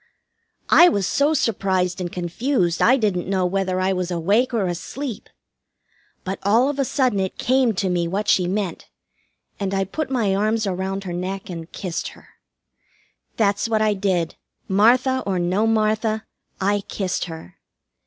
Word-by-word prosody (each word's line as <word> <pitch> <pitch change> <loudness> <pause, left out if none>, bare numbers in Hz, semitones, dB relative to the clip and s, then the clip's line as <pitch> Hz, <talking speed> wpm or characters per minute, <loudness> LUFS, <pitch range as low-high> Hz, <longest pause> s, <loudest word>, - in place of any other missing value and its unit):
I 350 - +8
was 200 - 0
so 290 +9 +2
surprised 190 -6 0
and 175 -1 -4
confused 175 - -1
I 260 +3 +5
didn't 195 -7 -1
know 190 -2 +1
whether 185 0 0
I 190 +1 +1
was 180 -1 -2
awake 200 +9 +1
or 225 -5 0
asleep. 220 - -5 0.9
But 190 +1 -4
all 225 +7 +3
of 285 -1 -4
a 275 - +2
sudden 255 -7 +1
it 190 -1 -2
came 255 -3 +2
to 190 +1 0
me 175 -2 0
what 200 +4 -2
she 180 -2 +3
meant, 190 -2 -3 0.7
and 195 -1 -2
I 195 - +1
put 280 - -4
my 230 -7 +1
arms 215 +2 +1
around 190 +1 -3
her 180 -2 -5
neck 190 +2 -4
and 165 -1 -8
kissed 180 -4 -4
her. - - -19 1.1
That's 205 0 +1
what 220 -1 +2
I 215 -1 +3
did, 190 -4 0 0.3
Martha 250 +6 +3
or 190 -2 0
no 185 +5 +1
Martha; 220 0 +1 0.3
I 205 +1 +1
kissed 190 -3 -2
her. 160 - -10
195 Hz, 165 wpm, -22 LUFS, 185-225 Hz, 1.1 s, I